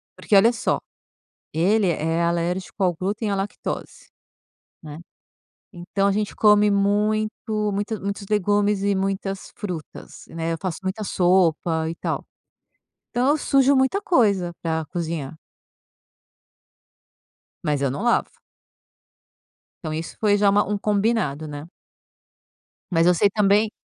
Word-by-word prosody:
Porque 210 - 0
olha 210 +4 +6
só, 235 - 0 0.8
ele 195 +6 +2
é 165 0 0
alérgico 175 +3 -1
ao 180 -1 +3
glúten 205 +5 -2
e - - -1
à - - 0
lactose, 195 +1 -5 0.8
né, 150 -1 -9 0.8
então 195 +3 -1
a - - +2
gente 210 +1 -2
come 210 -1 +5
muito 210 +2 +1 0.4
muita 205 +1 -3
muitos 200 +1 -4
legumes 205 0 +1
e 200 0 +1
muitas 195 0 -3
frutas, 180 -7 -7
né, 165 0 -3
eu - - -2
faço 185 -4 -3
muita 190 +3 -3
sopa, 175 -4 +2
e - - -4
tal. - - -3 0.9
Então 250 +3 +1
eu 295 - +3
sujo 275 -1 +3
muita 265 +10 +2
coisa, 205 - +2
pra 160 -1 -2
cozinhar. 165 -4 -4 2.3
Mas 150 -3 0
eu 140 -2 +1
não 145 - -4
lavo. 240 - +2 1.5
Então 155 -2 -4
isso 160 +1 -6
foi 205 -2 +3
já 205 0 +4
uma 205 +1 +3
um 205 +1 -1
combinado, 205 -7 0
né. 145 +1 -8 1.2
Mas 165 -1 +3
eu 180 - +6
sei 200 +4 +3
também 210 +1 +2
195 Hz, 135 wpm, -23 LUFS, 170-210 Hz, 2.3 s, olha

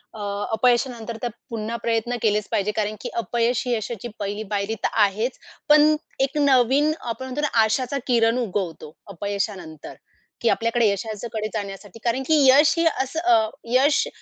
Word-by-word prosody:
अ, 210 - -7 0.3
अपयशानंतर 235 -1 0
तर 240 - 0 0.2
पुन्हा 230 0 -4
प्रयत्न 230 +1 0
केलेच 210 -1 +1
पाहिजे 205 +1 0
कारण 215 0 -1
की, - - -4
अपयश 235 +3 0
ही 245 - +1
यशाची 225 +1 -5
पहिली 205 +2 -3
पायरी 205 +2 -1
तर - - +2 0.2
आहेच, 215 +6 -2 0.3
पण 300 +1 +6 0.3
एक 280 - -8
नवीन, 280 +1 +4
आपण 240 +3 -5
म्हणतो 260 +3 -4
ना, 300 - +2 0.2
आशाचा 255 +5 0
किरण 230 -1 +3
उगवतो 185 -9 -4 0.2
अपयशानंतर, 195 -4 -5 0.5
की 235 - +2
आपल्याकडे 230 0 +2
यशाच्याकडे 215 +2 -4
जाण्यासाठी 200 +1 -6
कारण 245 +3 0
की 305 -3 +4
यश 295 +4 +6
हे 335 - +2 0.2
असं 270 +5 -4
अ 220 -1 +3 0.2
यश 280 +3 +3
230 Hz, 155 wpm, -23 LUFS, 210-255 Hz, 0.5 s, पण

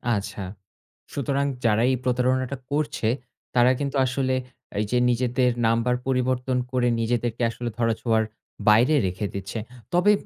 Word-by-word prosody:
আচ্ছা। 100 -1 -4 0.7
সুতরাং, 140 0 0 0.2
যারা 110 0 +4
এই - - +2
প্রতারণাটা 130 +1 +1
করছে, 150 -5 0 0.5
তারা 125 +1 +6
কিন্তু 140 -1 -2
আসলে 130 +1 0 0.5
এইযে 105 +4 0
নিজেদের 125 +1 +2 0.2
নাম্বার 115 +2 +2
পরিবর্তন 130 0 +1
করে, 125 -1 +2
নিজেদেরকে 120 0 -1
আসলে 120 +1 -4
ধরা 115 -1 +2
ছোঁয়ার 110 -2 +2 0.5
বাইরে 120 +8 +5
রেখে 95 +3 -3
দিচ্ছে। 100 +3 -4 0.3
তবে 180 +4 +5
125 Hz, 130 wpm, -25 LUFS, 115-130 Hz, 0.7 s, তারা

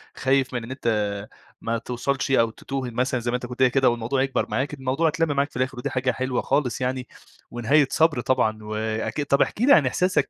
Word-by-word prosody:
خايف 130 0 +1
من 120 - -3
إن 115 - -8
أنت 130 -2 -5 0.7
ما 115 0 -1
توصلش 125 +3 -2
أو 115 -4 +4
تتوه 130 +2 -5
مثلًا 125 +2 0
زي 120 +1 -2
ما - - 0
أنت 125 - -7
كنت 125 +1 -8
قايل 130 -2 +5
كده 135 -1 +4
والموضوع 120 +3 -1
يكبر 135 0 -1
معاك، 130 +7 -1
الموضوع 135 +3 0
اتلم 160 -1 0
معاك 140 +1 +1
في - - -8
الآخر 130 +1 -1
ودي 130 +3 -3
حاجة 130 -1 0
حلوة 130 -1 -2
خالص 135 -3 0
يعني، 125 0 -2 0.4
ونهاية 135 +5 +3
صبر 160 -6 +3
طبعًا، 110 -4 0
وأكيد 110 +6 -3
طَب 140 0 +2
احكِ - - 0
لي 275 +4 +6
عن 145 - +5
إحساسك 180 +8 +1
130 Hz, 215 wpm, -24 LUFS, 120-140 Hz, 0.7 s, لي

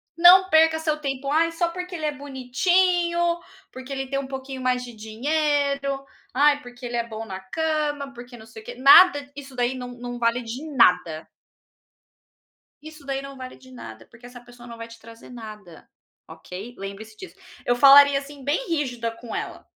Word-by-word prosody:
Não 365 +2 +7
perca 320 0 +4
seu 310 -1 -1
tempo, 275 -1 -4
'ai 330 +2 +2
só 340 0 0
porque 360 +1 -7
ele 310 -2 -4
é 300 - 0
bonitinho, 340 +6 +1 0.3
porque 260 +1 -10
ele 270 -1 -4
tem 275 +1 -2
um 275 - -6
pouquinho 265 0 -7
mais 250 0 0
de 240 -1 -10
dinheiro. 280 +4 -1 0.3
Ai, 290 +2 +3
porque 245 0 -12
ele 240 0 -3
é 235 0 -2
bom 220 0 -7
na 190 -3 -7
cama, 295 +5 -2
porque 245 0 -11
não 220 - -14
sei 220 0 -12
o - - -21
quê', - - -8
nada! 285 +2 +6
Isso 270 -2 -10
daí 245 +1 0
não 250 -1 -7
não 245 0 -7
vale 235 +1 0
de 235 +5 -7
nada" 180 -8 +3 1.6
"isso 310 -2 -12
daí 275 0 -3
não 275 -1 -10
vale 255 0 -9
de 260 0 -18
nada, 115 - -11
porque 230 +1 -16
essa 245 0 -12
pessoa 245 0 -15
não 235 - -9
vai 230 0 -8
te 230 0 -14
trazer 230 +2 -15
nada. 215 -8 -11 0.4
Ok? 180 +8 -10
Lembre-se 200 +3 -9
disso.". 375 - -11 0.3
Eu 245 - +2
falaria, 280 +1 +7
assim, 280 -1 -12
bem 305 - -1
rígida 250 -7 -2
com 230 0 -10
ela. - - -6
265 Hz, 190 wpm, -23 LUFS, 235-290 Hz, 1.6 s, Não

